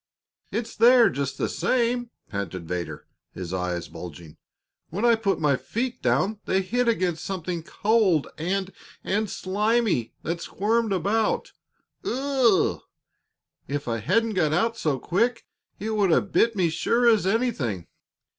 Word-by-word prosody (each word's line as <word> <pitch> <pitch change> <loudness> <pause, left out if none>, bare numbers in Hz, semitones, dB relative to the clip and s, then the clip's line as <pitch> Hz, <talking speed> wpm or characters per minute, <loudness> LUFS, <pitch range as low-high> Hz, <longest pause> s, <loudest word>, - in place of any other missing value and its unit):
"It's 230 0 -3
there, 240 +1 +6
just 140 -1 -3
the - - 0
same," 245 -1 0 0.2
panted 95 -4 -5
Vedder, 90 0 -4 0.3
his 90 -1 -6
eyes 90 -2 -2
bulging. 80 -2 -10 0.5
"When 200 +8 -2
I 235 - +6
put 220 -3 0
my 145 -3 +3
feet 230 - -3
down 180 - +1
they 190 0 +1
hit 245 +6 0
against 185 -8 0
something 180 -3 -3
cold 200 -3 +2
and 190 +4 -2 0.3
and 210 +2 0
slimy 210 - 0
that 170 +1 -3
squirmed 220 +4 0
about. 200 +4 0 0.5
Ugh! 260 -5 +2 0.9
If 145 0 -3
I 115 -1 -1
hadn't 220 - +1
got 155 -6 +1
out 225 +8 +1
so 150 -10 0
quick, 225 - 0 0.3
it 220 +2 -3
would 205 -3 +2
have 190 +4 +2
bit 230 -1 +3
me 175 -4 +2
sure 235 +9 +2
as 220 -5 +4
anything. 175 - 0
195 Hz, 140 wpm, -25 LUFS, 145-230 Hz, 0.9 s, there